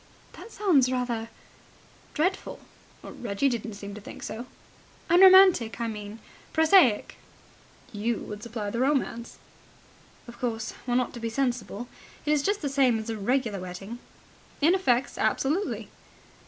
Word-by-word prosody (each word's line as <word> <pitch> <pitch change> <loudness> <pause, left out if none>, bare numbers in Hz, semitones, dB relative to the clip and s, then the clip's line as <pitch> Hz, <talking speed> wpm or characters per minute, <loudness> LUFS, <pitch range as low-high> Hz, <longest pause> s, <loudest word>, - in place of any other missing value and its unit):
"That 460 - -12
sounds 310 - +3
rather... 240 -3 -2 0.9
dreadful." 365 +5 -1 0.4
"Reggie 240 +4 -2
didn't 230 -3 -4
seem 200 0 -8
to 210 - -9
think - - -10
so." 240 +3 -6 0.6
"Unromantic, 370 - +7
I 235 - -1
mean.... 210 -1 -7 0.4
Prosaic." 320 - +4 0.7
"You 220 +2 -1
would 210 0 -8
supply 220 -3 -5
the 235 - -3
romance." 260 -3 -1 0.9
"Of 235 0 -12
course, 225 -3 -3 0.2
one 245 0 +2
ought 250 - -2
to 240 - -7
be 230 0 -3
sensible. 240 -3 -2 0.4
It 300 - +1
is 300 -1 +3
just 405 +4 -1
the - - 0
same 270 -4 +3
as 220 +1 -4
a 220 - -4
regular 230 -1 0
wedding." 185 +6 -8 0.6
"In 320 +4 +4
effects, 265 -9 +1
absolutely." 320 +10 0
240 Hz, 140 wpm, -27 LUFS, 220-285 Hz, 0.9 s, Unromantic